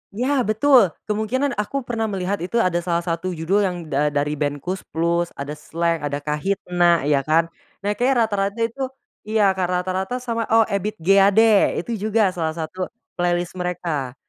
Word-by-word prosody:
Ya, 260 +5 +1
betul, 235 +1 +5 0.2
kemungkinan 220 +7 -1
aku 270 +6 -2
pernah 230 -2 -2
melihat 195 -1 -2
itu 180 +6 -5
ada 175 -1 +1
salah 170 0 -1
satu 170 +1 -2
judul 165 +5 +1
yang 190 -3 0
da 145 +2 +2
dari 145 0 -1
ben 145 -1 0
Koes 180 +7 -4 0.2
Plus, 170 +1 +1
ada 140 +1 -5
Slank, 165 +2 -2
ada 145 -1 -3
Kahitna, 175 +2 +1
ya, 145 -1 +3
kan. 165 +2 +2 0.3
Nah, 205 - +1
kayaknya 245 +3 +2
rata-rata 200 0 -1
itu 260 +4 -2 0.4
iya, 215 -2 +3
Kak, 190 -1 -1
rata-rata 185 +4 -1
sama 230 -2 -2
oh, 225 0 +5
Ebid 200 0 -2
G. 195 +3 +5
Ade, 205 +2 +5
itu 235 - -6 0.2
juga 215 -3 +3
salah 160 -3 -3
satu 170 +3 -4 0.3
playlist 175 0 0
mereka, 165 -7 -3
185 Hz, 170 wpm, -22 LUFS, 165-215 Hz, 0.4 s, betul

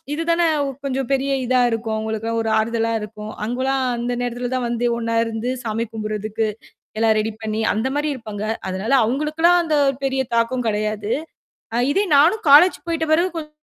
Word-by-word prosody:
இதுதானே 335 +2 +1 0.4
கொஞ்சம் 265 -2 -2
பெரிய 275 +1 +1
இதா 255 +1 +2
இருக்கும், 225 -1 -2
அவுங்களுக்குலாம் 220 +1 -2
ஒரு 225 - -3
ஆறுதலா 230 +1 0
இருக்கும். 210 0 -8
அவுங்கலாம், 260 +3 -1
அந்த 240 +1 -2
நேரத்துல 245 0 -3
தான் 250 -2 -1
வந்து 235 0 -2
ஒண்ணா 230 0 -2
இருந்து 225 +2 -3
சாமி 225 0 -1
கும்பிடுறதுக்கு 215 0 -2 0.5
எல்லாம் 220 0 +3
ரெடி 220 +1 -2
பண்ணி 220 0 -2
அந்த 225 +5 0
மாரி 295 +1 0
இருப்பாங்க. 215 -5 -6 0.2
அதனால, 190 +6 -2
அவங்களுக்குலாம் 305 +7 +2
அந்த 315 -2 0 0.3
பெரிய 270 0 0 0.2
தாக்கம் 235 +1 0
கிடையாது. 215 0 -2 0.6
அ - - +1
இதே 395 +7 +2
நானும் 350 +10 +4
காலேஜ் 310 +6 +8
போய்ட்ட 330 -1 -1
பிறகு 340 +4 +3
கொஞ் 310 -2 -5
235 Hz, 165 wpm, -21 LUFS, 220-275 Hz, 0.6 s, காலேஜ்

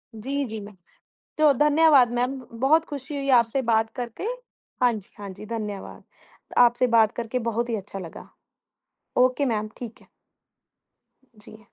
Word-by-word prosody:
जी, 275 +5 -2
जी, 220 -1 -5
मै 205 +1 -10 0.7
तो 305 -2 +6
धन्यवाद 295 -4 +5
मैम, 250 +2 0 0.3
बहुत 315 +4 +4
ख़ुशी 285 0 -6
हुई 275 0 -3
आपसे 235 +3 0
बात 220 0 +2
करके 240 - -5 0.6
हाँ 245 -1 +5
जी, 210 -3 -7
हाँ 200 -1 -7
जी 210 +3 -10
धन्यवाद। 210 -3 -6 0.5
आपसे 245 +1 +5
बात 220 -1 +5
करके 235 +1 -2
बहुत 235 +2 -2
ही 230 - -1
अच्छा 195 0 -7
लगा, 170 -3 -9 0.9
ओके 255 +3 +3
मैम 215 -3 -1
ठीक 235 -2 -9
है। - - -21 1.3
जी। 215 +1 -14
235 Hz, 150 wpm, -25 LUFS, 215-275 Hz, 1.3 s, तो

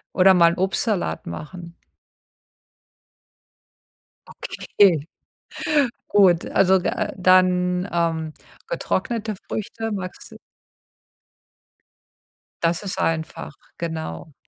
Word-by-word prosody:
Oder 190 0 +6
mal 170 -2 +5
'n 170 - -5
Obstsalat 190 - -1
machen. 170 - -8 2.5
Okay, 170 -7 +1 1.0
gut. 185 -5 +4
Also, 190 0 +3
äh, 185 - -1
dann, 180 0 +3
ähm, 165 -2 -1 0.3
getrocknete 230 - -2
Früchte, 225 +1 -4
magst 185 -3 -6
d - - -12 2.3
Das 170 +4 +1
ist 190 - -4
einfach, 160 -1 -2 0.2
genau. 160 -2 -5
180 Hz, 80 wpm, -22 LUFS, 165-195 Hz, 2.5 s, Oder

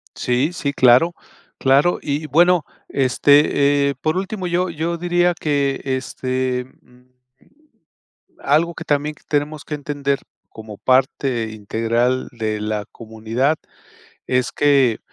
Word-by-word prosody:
Sí, 125 +6 0
sí, 140 -5 -3
claro, 130 +7 +5 0.4
claro. 140 +6 +3
Y 145 +2 -3
bueno, 175 +2 +4 0.2
este, 140 +1 +3
eh, 140 - -3
por 155 +6 -1
último, 190 0 -3
yo 175 +1 0
yo 170 +1 -3
diría 175 +1 +1
que 140 -4 -1
este, 130 -1 -2 0.2
mm 125 +1 -24 1.3
Algo 160 +4 +1
que - - -7
también 150 +1 0
tenemos 150 0 -2
que - - -6
entender 145 -1 -2 0.3
como 110 -2 -11
parte 130 -2 +1
integral 115 +4 -1
de 110 -3 -3
la 105 -1 -3
comunidad 115 +6 -2 0.7
es 125 -1 0
que, 140 -6 +3
140 Hz, 120 wpm, -20 LUFS, 125-155 Hz, 1.3 s, claro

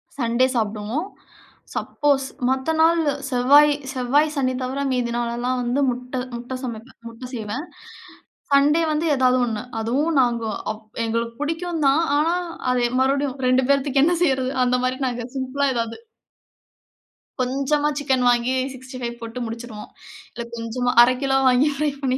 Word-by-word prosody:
Sunday 240 -1 +2
சாப்பிடுவோம். 220 - -2 0.7
Suppose 280 -2 0 0.2
மத்த 265 +4 0
நாளு, 325 -2 +3 0.2
செவ்வாய், 285 +4 +5 0.2
செவ்வாய் 280 +4 +2
சனி 255 -2 0
தவிர 260 +2 -3
மீதி 245 -2 0
நாள் 240 -1 -1
எல்லாம் 250 +1 -1
வந்து, 245 +3 0
முட்டை 250 +1 -4 0.2
முட்டை 245 +2 -6
சமைப்பேன், 235 0 -7
முட்டை 230 +2 -9
செய்வேன். 225 +5 -4 0.9
சண்டே 290 +4 +4
வந்து 305 +2 0
ஏதாவது 255 -1 +3
ஒண்ணு. 220 -3 -3 0.2
அதுவும் 280 +8 0
நாங்க 240 -2 0 0.3
அப் 215 0 -10 0.2
எங்களுக்கு 230 +1 -2
புடிக்கும் 325 +1 -2
தான் 285 +5 +3
ஆனா, 330 +4 +2 0.4
அது 250 -1 +1 0.2
மறுபடியும் 275 0 0
2 255 +1 +3
பேர்த்துக்கு 275 0 +3
என்ன 350 +2 +2
செய்றது 265 -5 +1
அந்த 250 0 +2
மாரி 255 +1 -1
நாங்க 245 -1 -3
சிம்பிளா 265 +2 -1
ஏதாவது. 230 -1 -2 1.4
கொஞ்சமா 275 +4 0
சிக்கன் 265 -3 +1
வாங்கி 240 +1 +2 0.2
65 255 -2 -7
போட்டு 230 +2 -6
முடிச்சுருவோம். 225 -2 -7 0.4
இல்லை 235 - -6
கொஞ்சமா 235 +2 -2
1/2 245 +1 +6
கிலோ 270 -1 +2
வாங்கி 255 +4 +4
ஃப்ரை 300 +1 0
பண்ணி 260 -2 0
255 Hz, 145 wpm, -22 LUFS, 240-280 Hz, 1.4 s, 1/2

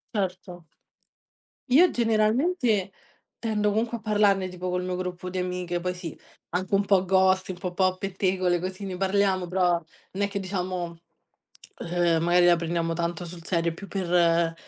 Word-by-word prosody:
Certo. 185 -3 -3 1.1
Io 325 +8 +6
generalmente, 225 - +1 0.5
tendo 215 -2 0
comunque 225 +3 0
a - - -15
parlarne, 205 -3 +2
tipo 180 0 -5
col 180 0 -1
mio 180 0 -3
gruppo 180 0 -5
di 185 - -5
amiche, 180 -1 -2
poi 180 +1 -2
sì, 175 -3 -7 0.3
anche 185 +3 -1
un 200 - +3
po' 195 -2 +3
ghost, 190 0 +3
un 185 - -4
po' 180 0 -5
po' 185 0 +2
pettegole 185 -2 0
così, 185 +3 -5
ne 190 -2 -4
parliamo, 190 -1 +1
però 180 0 +2
non 170 +3 -4
è - - +2
che 200 0 -4
diciamo 180 -3 -4 0.9
ehm, 170 -2 +2
magari 175 +1 +4
la 175 -1 +6
prendiamo 165 0 -1
tanto 170 +1 -2
sul 170 -1 -10
serio, 170 -2 0
più 200 +4 -10
per 170 -3 +2
185 Hz, 165 wpm, -26 LUFS, 175-195 Hz, 1.1 s, Io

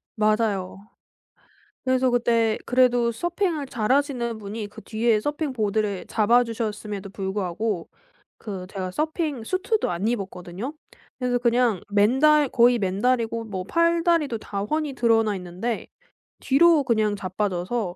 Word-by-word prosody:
맞아요. 215 -4 0 1.1
그래서 260 0 +2
그때 230 -2 +2
그래도 245 -2 +3
서핑을 345 - -1
잘하시는 245 -1 0
분이 210 +1 -6
그 - - -12
뒤에 220 -1 +1
서핑 295 +1 -2
보드를 210 -3 -1
잡아 235 +3 +3
주셨음에도 210 -3 -4
불구하고 195 -1 -3 0.5
그 190 -4 -6
제가 185 -2 -4
서핑 305 - -2
슈트도 405 - 0
안 175 +5 -2
입었거든요. 195 - -4 0.5
그래서 250 -1 0
그냥 235 -4 +2
맨다 265 +9 +4
거의 245 -1 +4
맨다리고 230 +3 0
뭐 190 -4 -5
팔다리도 335 - +2
다 200 -1 -5
훤히 300 +5 -2
드러나 225 -4 +2
있는데 185 +6 -4 0.5
뒤로 310 +2 +4
그냥 215 -4 +1
자빠져서 190 +1 -2
230 Hz, 295 characters per minute, -24 LUFS, 205-260 Hz, 1.1 s, 맨다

